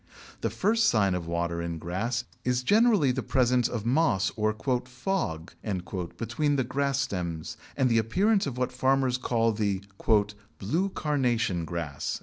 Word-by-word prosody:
The - - 0
first 220 +3 +2
sign 100 -4 +2
of 90 -2 -3
water 85 0 -1
in 85 -1 -3
grass 95 +9 -2 0.2
is 125 0 0
generally 205 - +4
the 130 +1 -2
presence 125 -2 +2
of 115 -3 -4
moss 120 - +2
or 110 0 +1 0.3
"fog" 125 - -3 0.6
between 145 +6 0
the 130 - +1
grass 140 +2 0
stems 85 -8 -3 0.2
and 130 -2 +3
the 115 -2 +3
appearance 195 - +2
of 130 -3 -5
what 125 0 0
farmers 130 0 +1
call 115 -2 +1
the 100 -3 -1 0.7
"Blue 165 - 0
Carnation 120 - 0
Grass." 80 -5 -4
120 Hz, 145 wpm, -28 LUFS, 95-135 Hz, 0.7 s, generally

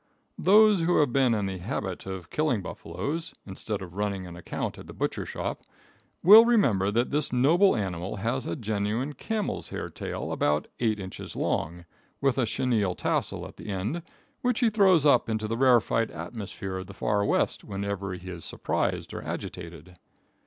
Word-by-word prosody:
Those 210 +1 +6
who 175 +2 +2
have 145 -5 +3
been 130 -4 +3
in 105 -2 -1
the 95 -1 -4
habit 90 - -4
of 95 -3 -6
killing 145 -10 +1
buffaloes, 160 - -4
instead 100 +1 -5
of 90 -2 -10
running 100 -1 -2
an 85 -1 -9
account 85 - -4
at - - -11
the - - -10
butcher - - -2
shop, - - -4 0.6
will 210 +6 +10
remember 135 - +3
that 120 +4 0
this 150 0 +1
noble 165 +10 +4
animal 95 -3 -3
has 115 +6 -2
a - - -2
genuine 110 +2 -2
camel's 215 - -3
hair - - -5
tail - - -5
about 75 +1 +1
eight 110 -3 +1
inches 95 -1 -7
long, 85 +2 -2 0.3
with 135 -1 +1
a 120 - +2
chenille 110 -5 0
tassel - - -1
at - - -15
the - - -9
end, 105 - -2 0.4
which 250 -1 0
he 230 -2 +4
throws 190 -7 +5
up 125 -5 +4
into 110 -1 -1
the 115 - -1
rarified 120 -3 +3
atmosphere 95 +2 -6
of 95 0 -6
the 100 - -11
far 105 0 +1
west, - - +1
whenever 100 -1 -4
he 90 +1 -11
is 85 -2 -7
surprised - - -2
or - - -5
agitated. 85 0 -7
110 Hz, 175 wpm, -27 LUFS, 95-145 Hz, 0.6 s, will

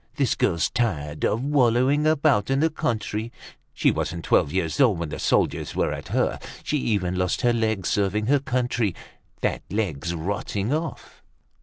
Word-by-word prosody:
This - - +2
girl's 85 - +1
tired 75 -11 -2
of 115 +4 +1
wallowing 140 +1 +3
about 145 -8 +2
in 135 0 +2
the 160 +2 +2
country; 110 -4 -2 0.4
she - - +2
wasn't 85 -1 -3
twelve 70 - +3
years 90 - 0
old 115 -9 +4
when 85 -2 -3
the - - -6
soldiers - - 0
were - - +1
at - - -7
her. - - 0 0.2
She 150 - 0
even 100 -9 0
lost 90 -1 0
her 120 -1 +3
leg 110 -5 0
serving 105 +1 +1
her 140 +4 +3
country. 120 -6 -1 0.5
That - - 0
leg's 85 -5 -2
rotting 100 - -2
off." 160 +1 -5
110 Hz, 165 wpm, -24 LUFS, 90-130 Hz, 0.5 s, old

